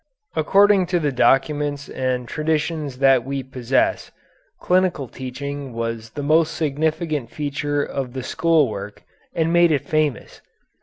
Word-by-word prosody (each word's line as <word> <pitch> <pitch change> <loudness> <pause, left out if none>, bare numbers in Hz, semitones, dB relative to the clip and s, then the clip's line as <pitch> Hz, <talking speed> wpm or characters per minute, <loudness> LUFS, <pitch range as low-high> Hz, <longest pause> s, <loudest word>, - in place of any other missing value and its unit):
According 195 +3 +4
to 180 -1 +1
the 150 -3 0
documents 145 +2 +1
and 125 -2 -2
traditions 155 -2 -2
that 135 -2 +4
we 135 +1 -4
possess, 130 0 0 0.5
clinical 180 -7 +1
teaching 135 +2 -6
was 115 -1 -4
the 145 - -6
most 160 +2 +2
significant 155 -2 -1
feature 145 0 -2
of 130 -3 -4
the 130 -1 -5
school 160 +1 +2
work 105 -1 -7 0.3
and 165 0 +1
made 175 -1 +5
it 145 - 0
famous. 155 -6 -1
145 Hz, 135 wpm, -21 LUFS, 130-160 Hz, 0.5 s, made